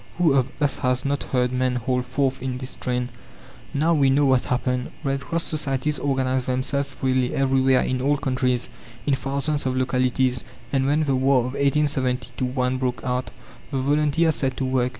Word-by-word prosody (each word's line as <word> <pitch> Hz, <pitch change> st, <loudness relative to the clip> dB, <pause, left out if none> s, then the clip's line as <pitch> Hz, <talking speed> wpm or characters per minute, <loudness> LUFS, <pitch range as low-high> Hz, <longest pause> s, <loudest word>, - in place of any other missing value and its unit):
Who 170 Hz, -5 st, +4 dB
of 130 Hz, -2 st, +3 dB
us 145 Hz, -2 st, +1 dB
has 125 Hz, +1 st, 0 dB
not 140 Hz, 0 st, -1 dB
heard 125 Hz, -1 st, +1 dB
men 130 Hz, 0 st, 0 dB
hold 125 Hz, +1 st, -1 dB
forth 130 Hz, 0 st, 0 dB
in 130 Hz, -1 st, -3 dB
this 130 Hz, 0 st, -6 dB
strain? 125 Hz, 0 st, -2 dB, 0.6 s
Now 155 Hz, +4 st, +2 dB
we 140 Hz, -4 st, +4 dB
know 140 Hz, +2 st, +4 dB
what 130 Hz, -2 st, +3 dB
happened. 125 Hz, 0 st, -1 dB
Red 135 Hz, -1 st, 0 dB
Cross 165 Hz, +4 st, -2 dB
societies 145 Hz, -1 st, -1 dB
organized 130 Hz, -2 st, 0 dB
themselves 135 Hz, +2 st, -1 dB
freely, 130 Hz, -2 st, 0 dB
everywhere, 135 Hz, -1 st, +3 dB
in 130 Hz, -1 st, -1 dB
all 145 Hz, +2 st, +2 dB
countries, 130 Hz, -3 st, 0 dB, 0.4 s
in 145 Hz, -, +2 dB
thousands 140 Hz, +2 st, -1 dB
of 130 Hz, 0 st, -1 dB
localities; 130 Hz, -1 st, +1 dB, 0.3 s
and 135 Hz, -1 st, +2 dB
when 150 Hz, +2 st, +2 dB
the 140 Hz, -3 st, +1 dB
war 130 Hz, 0 st, +3 dB
of 125 Hz, +2 st, -4 dB
1870 135 Hz, -3 st, 0 dB
1 125 Hz, 0 st, 0 dB
broke 125 Hz, -1 st, -2 dB
out, 125 Hz, 0 st, -1 dB, 0.4 s
the 140 Hz, -, -2 dB
volunteers 150 Hz, +4 st, +2 dB
set 130 Hz, -2 st, -1 dB
to 135 Hz, -, -1 dB
work. 130 Hz, -1 st, +1 dB
130 Hz, 180 wpm, -24 LUFS, 125-140 Hz, 0.6 s, Who